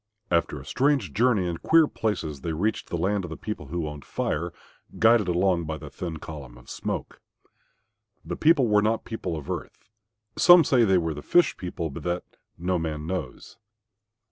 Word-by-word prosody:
After 85 -4 +1
a 65 - -12
strange 130 - +1
journey 110 -5 +2
in 85 -1 -3
queer 165 - +5
places 80 - -3
they 80 - -3
reached 105 +8 -1
the 85 - -2
land 95 +4 0
of 90 - -6
the 80 - -7
people 105 -9 -6
who 85 +1 -3
owned 75 -2 -7
Fire, 85 +3 -2 0.5
guided 115 -3 +5
along 90 -1 +1
by 80 0 -4
the - - -10
thin 85 -3 -5
column 70 -6 -9
of - - -13
smoke. - - -5 1.0
The - - -4
people 155 -5 +4
were 105 -1 +4
not 110 +2 0
people 110 -7 -4
of 75 - -8
earth. - - -7 0.5
Some 175 -1 +8
say 125 -4 +4
they 95 -3 +4
were 80 -2 0
the 75 - -7
Fish 175 - +3
people, 90 -3 -5
but - - -7
that, 90 0 -2 0.3
no 90 +1 0
man 80 -2 -4
knows. 90 - -6
90 Hz, 185 wpm, -26 LUFS, 80-110 Hz, 1.0 s, Some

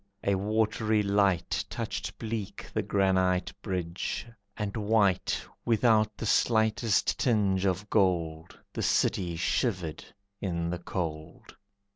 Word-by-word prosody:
A 100 - +2
watery 110 +2 +1
light 100 -4 +1
Touched - - -4
bleak 110 -3 -5
the - - +1
granite 95 -2 +1
bridge, 90 -1 -3 0.3
and 105 -2 -3
white 105 -3 +2 0.2
Without 110 -2 +3
the - - -4
slightest 110 0 +2
tinge 100 -6 +2
of 95 +2 -1
gold, 85 -6 0 0.2
The - - -3
city 85 -3 +1
shivered 85 +1 -1 0.4
in 85 -3 -2
the 90 - -3
cold. 80 -3 -5
100 Hz, 110 wpm, -29 LUFS, 90-110 Hz, 0.4 s, Without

